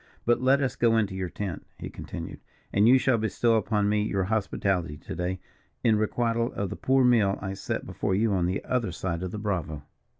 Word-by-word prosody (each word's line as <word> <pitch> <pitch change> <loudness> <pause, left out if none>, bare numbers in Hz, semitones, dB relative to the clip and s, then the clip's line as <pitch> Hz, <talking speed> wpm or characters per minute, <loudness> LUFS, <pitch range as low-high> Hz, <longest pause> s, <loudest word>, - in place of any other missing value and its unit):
But 120 +1 +3
let 135 +2 +4
us 130 -5 -1
go 115 -1 +3
in 110 - +3
to 95 - -8
your 95 -1 -3
tent," 100 -2 -5
he - - -7
continued, - - -7 0.3
"and 100 +2 +4
you 130 +2 +7
shall 130 -2 +2
bestow 115 +2 +1
upon 105 -1 +1
me 105 0 +2
your 100 -2 0
hospitality 95 -5 -1
to - - -8
day, 90 +1 -2 0.4
in 110 -2 +4
requital 115 +2 0
of 100 -2 -3
the - - -3
poor 130 -1 +3
meal 110 -5 +4
I 95 -1 -4
set 95 - -4
before 95 - -1
you 105 +1 +2
on 90 -2 +1
the 95 +2 -2
other 120 -6 0
side 85 0 -3
of 95 - -3
the 105 - -6
Bravo." 85 -8 -3
105 Hz, 220 wpm, -27 LUFS, 95-115 Hz, 0.4 s, you